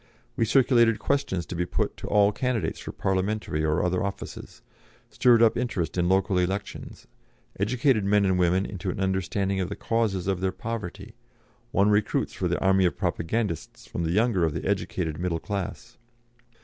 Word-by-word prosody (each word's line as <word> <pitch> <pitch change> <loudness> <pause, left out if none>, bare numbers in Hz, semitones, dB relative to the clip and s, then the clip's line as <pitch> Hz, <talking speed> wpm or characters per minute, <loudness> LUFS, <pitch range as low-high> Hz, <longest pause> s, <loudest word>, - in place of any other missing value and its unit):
We 115 - +1
circulated 120 -2 +4
questions 95 - -1
to 90 - -6
be 90 - 0
put - - -1
to - - -7
all 105 0 +4
candidates 125 -1 -2
for - - -7
parliamentary 95 -4 -1
or 75 +1 +1
other 90 +1 0
offices, 100 0 -7 0.5
stirred 120 -2 +5
up 115 - +4
interest 115 -9 -2
in 90 -1 +1
local 95 0 +2
elections, 95 +3 -4 0.5
educated 120 +2 +2
men 100 +1 +3
and 95 -1 +2
women 90 +2 +2
into 95 -1 -5
an 90 - -4
understanding 95 +1 0
of 95 -1 -1
the 100 - -4
causes 110 -6 -1
of 95 -2 -1
their 95 0 +1
poverty, 105 -2 -6 0.6
won 100 +1 +3
recruits 105 0 +1
for - - -2
the - - 0
army 95 -1 +3
of 90 - 0
propagandists 85 +1 -2
from - - -5
the 80 - -1
younger 105 -1 +2
of 80 -3 0
the - - -4
educated 80 -4 -2
middle 85 -2 -1
class. 105 +5 -5
95 Hz, 175 wpm, -26 LUFS, 90-110 Hz, 0.6 s, stirred